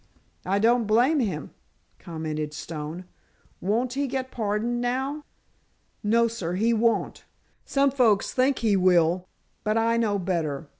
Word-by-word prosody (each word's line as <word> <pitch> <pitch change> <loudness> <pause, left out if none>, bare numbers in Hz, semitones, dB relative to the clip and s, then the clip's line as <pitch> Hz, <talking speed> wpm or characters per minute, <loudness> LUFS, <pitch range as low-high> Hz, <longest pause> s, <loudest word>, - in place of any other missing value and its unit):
"I 195 +2 +2
don't 230 +1 +3
blame 245 +8 +3
him," 190 - -2 0.5
commented 155 -2 -5
Stone. 160 +3 -6 0.6
"Won't 235 +6 0
he 280 +1 -1
get 260 0 -3
pardoned 225 +2 -1
now?" 265 +4 -2 0.8
"No, 230 +2 +3
sir, 200 -7 -4
he 225 +5 +2
won't. 230 +1 0 0.4
Some 275 0 +2
folks 235 -7 +2
think 260 +1 +2
he 210 -2 +4
will, 180 -1 +3 0.4
but 215 +1 +1
I 230 +1 +2
know 215 -3 +1
better. 165 -6 -2
220 Hz, 135 wpm, -25 LUFS, 180-245 Hz, 0.8 s, he